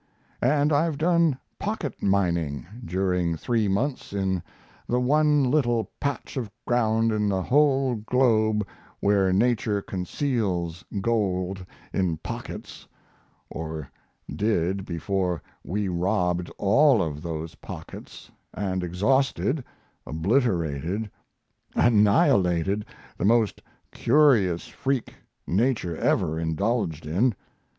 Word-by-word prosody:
And 145 +4 +3
I've 155 +1 +2
done 165 -3 +3 0.2
"pocket 205 - -3
mining" 85 -7 0 0.2
during 90 -2 0
three 115 +3 0
months 125 +5 -1
in 95 -2 0 0.5
the 125 - +2
one 150 +3 +3
little 120 -6 +1
patch 140 -1 -3
of 120 -5 -3 0.2
ground 115 -2 +2
in 105 -1 +1
the 95 -2 0
whole 135 0 +3
globe 110 -2 +2 0.3
where 100 -2 +3
Nature 110 0 +2
conceals 95 - -2 0.2
gold 95 -4 0 0.3
in 90 -4 0
pockets - - -8 0.6
or 80 -3 -6 0.4
did 95 -2 0
before 90 0 -1 0.2
we 100 +1 -2
robbed 90 -1 0
all 120 +3 +4
of 75 -2 -4
those 80 -1 -5
pockets - - -10 0.2
and 95 -2 -2
exhausted, 130 - +1 0.4
obliterated, 90 - 0 0.6
annihilated 100 -3 +3 0.3
the - - 0
most 115 0 +2 0.3
curious 115 - +3
freak 135 -2 -2 0.3
Nature 105 -4 0
ever 80 +1 +1
indulged 85 0 -1
in. 100 +10 +1
100 Hz, 100 wpm, -25 LUFS, 90-125 Hz, 0.6 s, all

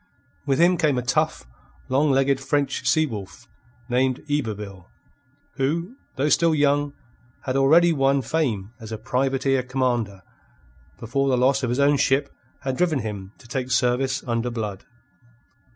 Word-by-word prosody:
With 135 -1 +2
him 175 +3 +4
came 150 -5 +2
a 125 - -1
tough, 155 - 0 0.4
long 140 +4 +2
legged 135 0 +2
French 140 0 -1
sea 155 0 +3
wolf 105 -9 -8 0.4
named 130 +1 0
Yberville, 105 -10 -3 0.7
who, 170 - -1 0.2
though 140 +3 0
still 165 +1 +3
young, 145 0 +2 0.5
had 130 -1 -2
already 165 +6 +5
won 135 -1 +2
fame 115 -9 -1
as 110 -1 -9
a 110 - -3
privateer 135 +3 0
commander 120 -6 -1 0.8
before 135 +4 -1
the 130 - +2
loss 130 +2 +3
of 125 - -1
his 125 +3 -1
own 140 +1 +4
ship 140 +1 +1 0.3
had 130 -1 -3
driven 175 -4 +2
him 100 -2 -6
to 120 - -17
take 130 +1 -3
service 130 +1 +1
under 120 0 -1
Blood. 105 -5 -5
135 Hz, 150 wpm, -23 LUFS, 120-145 Hz, 0.8 s, already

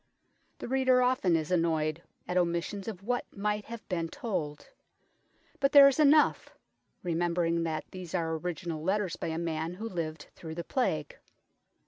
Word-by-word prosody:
The - - -6
reader 260 0 +3
often 250 -9 +2
is 160 +1 -1
annoyed 165 -2 +1 0.3
at 180 - -3
omissions 175 +3 0
of 195 -4 -6
what 245 +3 -1
might 210 +1 -1
have 230 -1 -9
been 165 -3 -2
told; 175 - -4 0.9
but 275 0 +2
there 280 -1 +10
is 275 +1 +2
enough, 300 0 +4 0.5
remembering 170 -1 0
that 160 -1 -3
these 185 -1 -7
are 165 -2 0
original 165 -1 -4
letters 190 0 0
by - - -4
a 160 0 -2
man 165 0 -2
who 220 +4 -5
lived 160 -6 -5
through 160 -1 -8
the 170 - -4
Plague. 275 - -1
180 Hz, 155 wpm, -30 LUFS, 165-225 Hz, 0.9 s, there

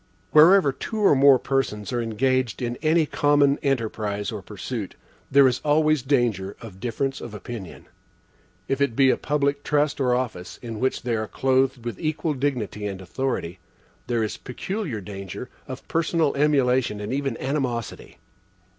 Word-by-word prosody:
Wherever 160 0 +7
two 220 - -6
or 210 -6 +5
more 135 -1 +6
persons 125 -5 -2
are 120 - 0
engaged 130 +2 0
in 120 -1 -2
any 160 0 +2
common 145 -1 +3
enterprise 110 -6 -1
or 105 -3 -5
pursuit, 105 +1 -6 0.3
there 140 -1 +6
is 125 -1 0
always 155 0 +3
danger 120 -8 0
of 100 -5 -11
difference 130 +4 -2
of 110 -3 -7
opinion. 105 -3 -8 0.8
If 135 +1 -1
it 140 -5 +1
be 135 0 +5
a - - +2
public 145 -1 0
trust 150 -1 +1
or 125 -2 +3
office, 115 -8 -4
in 115 -2 -6
which 130 +1 -1
they 120 -2 0
are 110 -1 -2
clothed 130 -1 +1
with 120 -4 -4
equal 155 0 -1
dignity 125 -7 -2
and 95 -2 -5
authority, 95 -3 -3 0.5
there 120 -2 0
is 110 - -3
peculiar 150 - -4
danger 100 +4 -7 0.2
of 130 -1 -8
personal 165 -2 +1
emulation 130 -6 +2
and 105 +4 -4
even 140 0 -2
animosity. 130 -4 -3
130 Hz, 155 wpm, -24 LUFS, 110-140 Hz, 0.8 s, Wherever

